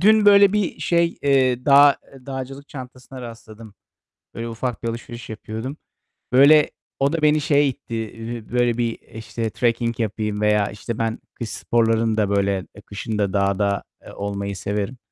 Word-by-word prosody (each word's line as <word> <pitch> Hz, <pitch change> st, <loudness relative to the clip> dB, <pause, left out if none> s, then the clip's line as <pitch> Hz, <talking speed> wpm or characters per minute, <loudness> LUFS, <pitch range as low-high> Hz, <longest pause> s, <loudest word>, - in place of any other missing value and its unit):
Dün 215 Hz, +2 st, +5 dB
böyle 200 Hz, -1 st, +7 dB
bir 210 Hz, -3 st, -1 dB
şey, 170 Hz, -1 st, +1 dB
eee, 130 Hz, -3 st, +2 dB
dağ 140 Hz, 0 st, +7 dB, 0.2 s
eee, 135 Hz, -1 st, -16 dB
dağcılık 135 Hz, +1 st, -6 dB
çantasına 130 Hz, -1 st, -10 dB
rastladım. 115 Hz, -2 st, -11 dB, 0.6 s
Böyle, 115 Hz, 0 st, -4 dB
ufak 115 Hz, +1 st, -4 dB
bir 115 Hz, -, -2 dB
alışveriş 120 Hz, 0 st, -7 dB
yapıyordum. 110 Hz, +5 st, -6 dB, 0.6 s
Böyle, 145 Hz, +4 st, +6 dB, 0.3 s
o 140 Hz, +2 st, +2 dB
da 165 Hz, -, -1 dB
beni 150 Hz, 0 st, +4 dB
şeye 145 Hz, -2 st, +3 dB
itti, 120 Hz, -2 st, -5 dB
eee, 115 Hz, 0 st, -6 dB
böyle 120 Hz, -1 st, +2 dB
bir, 115 Hz, -1 st, -1 dB
işte, 110 Hz, 0 st, -4 dB
trekking 115 Hz, +1 st, 0 dB
yapayım 105 Hz, -1 st, -2 dB
veya, 105 Hz, -1 st, +3 dB
işte, 110 Hz, +2 st, -6 dB
ben 115 Hz, 0 st, -1 dB
kış 115 Hz, -, -6 dB
sporlarını 115 Hz, -1 st, +1 dB
da 105 Hz, -2 st, +2 dB
böyle, 100 Hz, -3 st, +1 dB
eee, 100 Hz, -, -12 dB
kışın 105 Hz, +2 st, -5 dB
da 100 Hz, -2 st, 0 dB
dağda, 100 Hz, 0 st, +1 dB, 0.2 s
eee, -, -, -11 dB
olmayı 100 Hz, 0 st, -4 dB
severim. 105 Hz, +5 st, -3 dB
115 Hz, 165 wpm, -22 LUFS, 105-135 Hz, 0.6 s, böyle